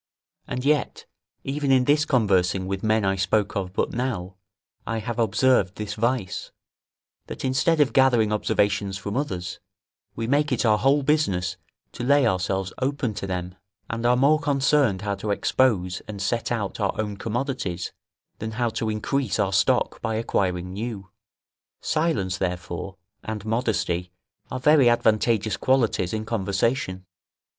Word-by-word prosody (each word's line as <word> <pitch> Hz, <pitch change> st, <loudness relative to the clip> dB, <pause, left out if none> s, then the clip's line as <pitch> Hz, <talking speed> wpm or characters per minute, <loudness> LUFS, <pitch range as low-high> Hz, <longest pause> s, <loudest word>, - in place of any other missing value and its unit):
And 125 Hz, +2 st, -4 dB
yet, 150 Hz, -2 st, 0 dB, 0.4 s
even 140 Hz, +1 st, -2 dB
in 130 Hz, -1 st, +5 dB
this 150 Hz, +2 st, +3 dB
conversing 95 Hz, -, +2 dB
with 95 Hz, 0 st, -3 dB
men 110 Hz, -1 st, +2 dB
I 95 Hz, 0 st, +2 dB
spoke 100 Hz, +2 st, 0 dB
of 95 Hz, -2 st, -2 dB
but -, -, -1 dB
now, 115 Hz, -7 st, -3 dB, 0.5 s
I 115 Hz, -, -1 dB
have 115 Hz, +2 st, -4 dB
observed 110 Hz, -2 st, +2 dB
this 105 Hz, -1 st, -4 dB
vice, 115 Hz, -3 st, -1 dB, 0.8 s
that -, -, -6 dB
instead 135 Hz, +5 st, +2 dB
of 145 Hz, -3 st, +3 dB
gathering 120 Hz, -5 st, +4 dB
observations 100 Hz, -2 st, 0 dB
from 100 Hz, +1 st, -5 dB
others, 90 Hz, -10 st, -3 dB, 0.6 s
we 115 Hz, -, -3 dB
make 145 Hz, +4 st, +1 dB
it 125 Hz, -, +1 dB
our 105 Hz, -1 st, +4 dB
whole 140 Hz, +2 st, +3 dB
business 95 Hz, -, +1 dB, 0.4 s
to 120 Hz, -, -6 dB
lay 140 Hz, +1 st, +4 dB
ourselves 95 Hz, -2 st, 0 dB
open 130 Hz, -3 st, -1 dB
to 100 Hz, -1 st, -5 dB
them, 90 Hz, -1 st, -4 dB, 0.4 s
and 115 Hz, 0 st, -3 dB
are 120 Hz, +1 st, +4 dB
more 145 Hz, +4 st, +4 dB
concerned 140 Hz, -7 st, +2 dB
how 100 Hz, -1 st, -1 dB
to 100 Hz, +2 st, -5 dB
expose 100 Hz, -4 st, +1 dB
and 105 Hz, -2 st, -7 dB
set 115 Hz, +4 st, -1 dB
out 105 Hz, -4 st, -2 dB
our 100 Hz, 0 st, -1 dB
own 105 Hz, -2 st, -2 dB
commodities, 115 Hz, -, -3 dB, 0.5 s
than 110 Hz, 0 st, -4 dB
how 120 Hz, +1 st, 0 dB
to 110 Hz, 0 st, -2 dB
increase 110 Hz, +1 st, -1 dB
our -, -, 0 dB
stock -, -, +2 dB
by 110 Hz, 0 st, -1 dB
acquiring 90 Hz, -5 st, -1 dB
new. 100 Hz, -2 st, -5 dB, 0.7 s
Silence, 110 Hz, -, 0 dB
therefore, 90 Hz, +1 st, -4 dB, 0.3 s
and 110 Hz, -1 st, -5 dB
modesty 110 Hz, -6 st, -1 dB, 0.4 s
are 130 Hz, -, -4 dB
very 140 Hz, -2 st, +5 dB
advantageous 110 Hz, -2 st, +2 dB
qualities 115 Hz, -9 st, +1 dB
in 110 Hz, 0 st, -3 dB
conversation. 100 Hz, -2 st, -1 dB
110 Hz, 150 wpm, -24 LUFS, 95-130 Hz, 0.8 s, in